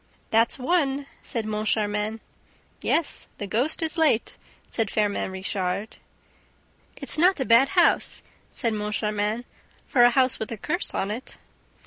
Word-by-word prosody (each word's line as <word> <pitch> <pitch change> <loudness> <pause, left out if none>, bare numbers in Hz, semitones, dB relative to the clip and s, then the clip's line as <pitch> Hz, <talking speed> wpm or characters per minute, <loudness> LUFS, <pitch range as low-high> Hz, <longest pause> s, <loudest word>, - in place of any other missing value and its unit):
"That's 225 +1 +3
one!" 280 -1 0 0.2
said 230 -4 -4
Moncharmin. 215 0 -1 0.6
"Yes, 330 - +1
the 205 - -4
ghost 245 - +1
is 320 +1 -1
late," 290 -8 +2 0.4
said 225 -3 0
Firmin 205 -2 0
Richard. 190 +2 -3 1.0
"It's - - +1
not 360 +1 +4
a 265 - -1
bad 240 +4 +5
house," 345 - +3 0.3
said 230 -4 -1
Moncharmin, 210 +2 -2 0.4
"for 250 - +2
'a 240 - +8
house 255 0 +2
with 220 - -5
a 225 - -4
curse - - -2
on 195 - -1
it.'" 235 +5 -6
225 Hz, 135 wpm, -25 LUFS, 210-270 Hz, 1.0 s, a